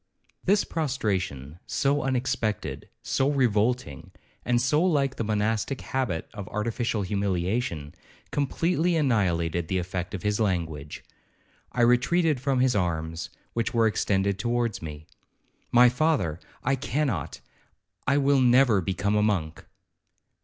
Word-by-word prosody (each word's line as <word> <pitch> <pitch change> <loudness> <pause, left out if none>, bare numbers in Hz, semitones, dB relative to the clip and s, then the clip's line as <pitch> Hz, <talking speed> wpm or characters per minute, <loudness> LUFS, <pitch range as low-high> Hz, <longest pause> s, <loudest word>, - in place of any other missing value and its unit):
'This 200 +2 +4
prostration, 95 - -2
so 140 +1 +1
unexpected, 125 -5 -2
so 135 +1 +1
revolting, 120 - 0 0.3
and 120 -1 +2
so 135 +7 +2
like 140 -7 +1
the - - -1
monastic 110 +4 -1
habit 125 -12 -2
of 100 -3 -7
artificial 115 0 -1
humiliation, 95 -4 -1 0.4
completely 165 +4 +1
annihilated 85 - +1
the 95 - 0
effect 90 +1 -3
of 90 - -7
his 105 +1 0
language. 80 -8 -2 0.7
I 125 - -1
retreated 135 +5 +3
from 135 -2 +1
his 130 -2 +3
arms, 85 -3 -2 0.2
which 115 +1 -1
were 115 -1 +4
extended 100 -2 +1
towards 120 -4 -1
me. 75 -1 -8 0.7
'My 125 +1 +7
father, 125 - +1 0.2
I 135 +2 +1
cannot,—I 140 0 -3
will 140 -1 +3
never 125 -4 +5
become 95 +3 -1
a 105 - +3
monk.' 90 -7 -1
110 Hz, 120 wpm, -26 LUFS, 95-130 Hz, 0.7 s, My